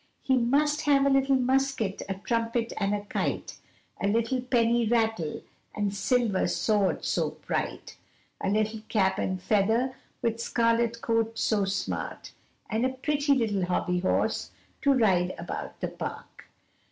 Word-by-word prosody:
He 265 - +3
must 290 +5 +2
have 280 -1 +4
a 280 - +4
little 270 0 +3
musket, 260 -5 +1
a 195 - -1
trumpet, 230 +3 -1
and 200 0 +1
a 205 - -3
kite, - - -3 0.4
A 200 - +1
little 230 +4 +1
penny 235 -2 +2
rattle 220 -8 0 0.3
and 205 -2 -1
silver 210 -1 +1
sword 210 -3 +1
so - - -1
bright, - - -3 0.5
A - - +1
little 215 +1 0
cap 190 -4 +2
and 185 0 -1
feather 220 +7 +1 0.3
with 230 0 0
scarlet 235 0 +1
coat 225 -1 0
so 205 -3 +1
smart, 195 0 -3 0.4
And 220 +1 -1
a 260 - +3
pretty 285 +2 +1
little 210 -7 0
hobby 180 0 0
horse 185 - 0 0.3
to 280 - +4
ride 185 -7 +2
about - - -6
the - - -1
park. - - -7
230 Hz, 145 wpm, -28 LUFS, 205-255 Hz, 0.5 s, have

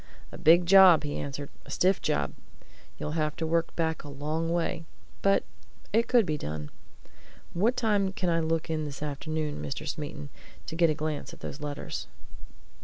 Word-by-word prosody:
"A - - -8
big 170 +3 +6
job!" 180 -4 +8
he 145 -1 -3
answered. 140 0 -5
"A - - -15
stiff 185 +7 +2
job! 70 -1 0 0.6
You'd 150 - -4
have 155 -1 -1
to 165 - -2
work 165 +1 0
back 160 -1 -1
a 145 - -9
long 155 +4 -2
way. 170 -1 -1 0.4
But 195 0 +3 0.5
it 230 +2 +3
could 240 -4 +4
be 155 -2 -2
done. 75 0 -5 0.8
What 225 +8 +2
time 205 -4 +2
can 185 -1 -2
I 165 -1 +2
look 165 0 0
in 160 -2 -2
this 145 0 -6
afternoon, 150 +1 -3
Mr. 150 +3 -4
Smeaton, 150 -1 -5 0.4
to - - -6
get 165 0 +4
a 155 - +1
glance 155 -1 -3
at - - -13
those 145 - -6
letters?" 145 -1 -5
160 Hz, 180 wpm, -28 LUFS, 145-175 Hz, 0.8 s, job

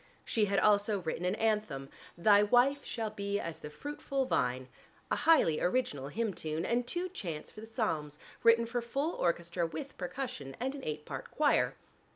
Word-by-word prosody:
She 220 -2 +2
had 200 0 0
also 205 0 +4
written 170 +1 -3
an 185 +3 +1
anthem, 210 -12 0 0.3
"Thy 205 +3 +6
wife 250 +7 +4
shall 220 -3 -3
be 200 -1 -2
as 165 -1 -5
the 150 - -7
fruitful 275 - -3
vine," 125 - 0 0.4
a - - +4
highly 240 - +4
original 175 - 0
hymn 220 +6 -1
tune, 160 +1 -2
and 240 +1 0
two 350 +7 -1
chants 170 - -6
for 215 - -10
the 220 - -9
psalms 160 - -2 0.2
written 230 0 +6
for 240 +1 -2
full 275 +8 -1
orchestra 170 0 0
with 275 - -7
percussion 180 - -5
and 260 +3 -1
an 280 - -8
eight 150 0 -4
part 135 -2 -6
choir. 295 -1 +2
210 Hz, 180 wpm, -32 LUFS, 165-245 Hz, 0.4 s, Thy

